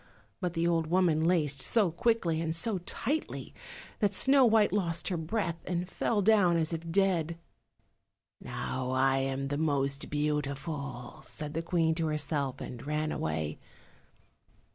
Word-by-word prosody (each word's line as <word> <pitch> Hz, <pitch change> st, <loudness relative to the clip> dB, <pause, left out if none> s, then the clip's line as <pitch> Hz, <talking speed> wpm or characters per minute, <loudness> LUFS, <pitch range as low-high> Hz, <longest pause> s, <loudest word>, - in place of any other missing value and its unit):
But 180 Hz, -3 st, -2 dB
the 165 Hz, +1 st, +1 dB
old 165 Hz, -2 st, +1 dB
woman 165 Hz, -2 st, +3 dB
laced 150 Hz, -6 st, +2 dB
so 185 Hz, -, +2 dB
quickly 170 Hz, -4 st, +1 dB
and 160 Hz, -1 st, -1 dB
so 195 Hz, +3 st, 0 dB
tightly 265 Hz, -, -3 dB, 0.5 s
that 205 Hz, -3 st, +1 dB
Snow 270 Hz, +4 st, +5 dB
white 220 Hz, -3 st, +4 dB
lost 170 Hz, -4 st, 0 dB
her 185 Hz, -, -1 dB
breath 170 Hz, +1 st, -2 dB
and 175 Hz, 0 st, -1 dB
fell 205 Hz, +2 st, 0 dB
down 195 Hz, -5 st, +5 dB
as 160 Hz, 0 st, 0 dB
if 165 Hz, 0 st, -4 dB
dead. 170 Hz, -3 st, +1 dB, 1.0 s
"Now 130 Hz, -1 st, -4 dB
I 135 Hz, +1 st, +3 dB
am 135 Hz, 0 st, -2 dB
the 145 Hz, +1 st, -1 dB
most 140 Hz, -3 st, 0 dB
beautiful," 140 Hz, -2 st, -3 dB
said 150 Hz, -1 st, -7 dB
the 165 Hz, -, -1 dB
Queen 165 Hz, -1 st, +1 dB
to 160 Hz, 0 st, -1 dB
herself, 145 Hz, -3 st, -1 dB
and 120 Hz, -2 st, -7 dB
ran 150 Hz, +1 st, -1 dB
away. 80 Hz, -1 st, -2 dB
160 Hz, 145 wpm, -30 LUFS, 145-180 Hz, 1.0 s, Snow